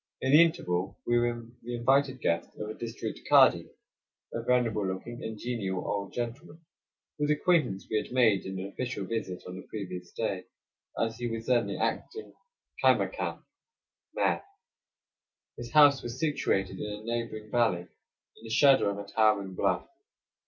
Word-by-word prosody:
In 130 - 0
the 150 +3 +9
interval 95 - -1
we 120 0 +3
were 120 -1 -1 0.2
the 120 +1 -5
invited 130 +2 +2
guests 85 0 0
of 105 - -5
a 110 - -5
district 115 +1 -5
kadi, - - +6 0.6
a 115 - -2
venerable 115 -4 +1
looking 105 +6 -5
and 110 -1 -5
genial 105 -6 -3
old 100 -1 -2
gentleman 135 +7 -5 0.6
whose 150 0 +1
acquaintance 150 - +2
we 110 - 0
had 105 - -3
made 115 -6 +4
in 95 0 -5
an 95 - -4
official 105 0 -4
visit 105 -4 -4
on 90 +1 -7
the - - -10
previous 90 -4 -6
day, 95 -5 -3 0.5
as 115 0 -1
he 120 0 -3
was 115 0 -4
then 120 -1 +2
the - - -4
acting 435 +1 -3 0.5
caimacam - - +1 0.7
(mayor). - - +1 1.1
His 120 0 -7
house 145 -1 +6
was 120 +1 -6
situated 95 - 0
in 105 - -4
a 105 +1 -8
neighboring 115 -2 -4
valley 115 -8 +2
in 90 - -22
the 115 - -9
shadow 130 -1 +5
of 100 - -3
a 100 - -5
towering 100 -2 +2
bluff. - - 0
115 Hz, 160 wpm, -29 LUFS, 100-125 Hz, 1.1 s, the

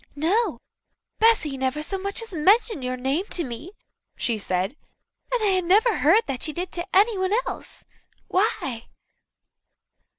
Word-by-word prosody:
"No. 355 - +1 0.6
Bessy 365 -12 +3
never 265 +3 -1
so 385 +5 -3
much 400 +4 -3
as 450 - -11
mentioned 395 - +3
your 255 0 -2
name 270 +9 -1
to 345 - -1
me," 265 - -7 0.4
she 230 -3 -1
said, 190 +5 -1 0.6
"and - - 0
I 380 -3 +3
never 415 +6 +3
heard 370 +10 +4
that 265 -3 -4
she 310 - 0
did 355 +2 -4
to 345 0 -3
anyone 390 -1 +3
else. - - -8 0.4
Why?" 275 - -1
355 Hz, 140 wpm, -24 LUFS, 270-410 Hz, 0.6 s, heard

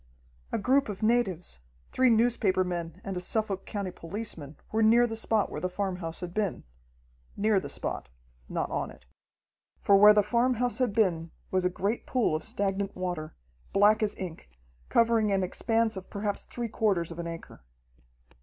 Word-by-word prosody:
A - - 0
group 260 +4 +2
of 205 0 -5
natives, 195 - 0 0.3
three 255 0 +4
newspaper 220 -5 +3
men 175 -1 -4
and 195 -4 -4
a 180 - -3
Suffolk 200 0 -2
County 200 -3 -3
policeman 165 -5 -7
were 220 - +1
near 230 +2 +6
the 225 -2 -3
spot 220 -1 0
where - - -5
the 185 - -1
farmhouse 180 -3 -4
had 175 -1 -5
been 205 -3 -1 0.7
near 210 -1 +3
the - - -7
spot, - - -4 0.4
not - - -2
on - - -2
it. - - -15 0.7
For 200 - +4
where 210 +1 +8
the 210 - +5
farmhouse 245 +2 +1
had 250 -4 +2
been 175 -7 +1 0.2
was 185 -1 +1
a - - +4
great 200 +5 -2
pool 240 -11 +1
of 155 - -3
stagnant 195 0 -2
water, 175 -4 -4 0.4
black 210 +3 +5
as 210 -1 0
ink, 165 - -7 0.4
covering 230 -2 +3
an 195 -1 +2
expanse 225 +4 0
of 190 -1 -8
perhaps 205 0 -3
three 240 -1 -4
quarters 195 -7 0
of 170 - -8
an 170 - -3
acre. 165 - -8
200 Hz, 175 wpm, -28 LUFS, 180-225 Hz, 0.7 s, where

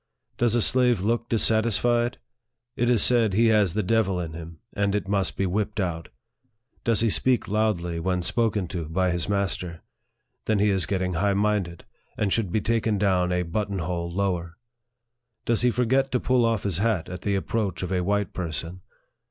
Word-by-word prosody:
Does 120 -1 +2
a 120 - +2
slave 125 -5 +3
look 115 +3 -1
dissatis 110 -1 +2
fied? 120 0 +1 0.6
It 120 0 +1
is 120 -3 +4
said, 115 -5 +3
he 115 +3 +4
has 105 -5 +3
the 105 - 0
devil 95 -2 +1
in 80 -2 -5
him, 80 0 -9 0.2
and 100 -1 0
it 105 - -2
must 100 -1 0
be 95 - 0
whipped 105 +3 -2
out. 85 -4 -3 0.7
Does 115 -2 +2
he 115 - +3
speak 125 +2 +1
loudly 100 -6 0
when 90 +1 -1
spoken 105 -2 0
to 85 -2 -4
by 90 +2 +1
his 85 +1 -2
master? 95 -4 -2 0.6
Then 110 - +1
he 105 +1 +3
is 95 -2 +1
getting 95 -2 -1
high 100 +4 +1
minded, 100 -4 -1 0.3
and 100 -2 0
should 110 -6 -1
be 110 - 0
taken 115 -1 0
down 95 -3 +1
a 90 0 0
button 100 +3 -3
hole 85 0 -3
lower. 90 -3 -2 0.9
Does 115 -2 +1
he 125 - +4
forget 130 +3 +1
to 125 - +2
pull 125 -1 +2
off 115 -2 0
his 95 -4 -1
hat 105 -5 0
at 90 0 -7
the 100 0 0
approach 100 0 -2
of 90 - -4
a 90 - +1
white 100 +1 -1
person 85 +1 -5
100 Hz, 190 wpm, -25 LUFS, 90-115 Hz, 0.9 s, is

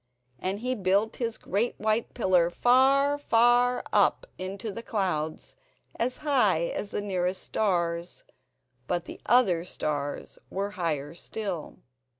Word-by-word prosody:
And 195 +3 -3
he 250 +1 0
built 200 +1 +1
his 230 -2 -2
great 210 +6 -1
white 215 +1 0
pillar 185 -7 +3
far, 270 +7 +4
far 245 -1 +3
up - - +3
into 195 +3 -5
the 230 - -6
clouds, 180 -9 -2 0.4
as 250 +2 -1
high 210 - +2
as 205 - -3
the 205 - -3
nearest 185 -2 -1
stars; 170 -4 -1 0.6
but 175 -1 -1
the - - -10
other 195 -9 +4
stars 145 -5 -4
were 200 +2 -3
higher 155 -6 -2
still. 185 -1 -5
200 Hz, 130 wpm, -27 LUFS, 175-235 Hz, 0.6 s, far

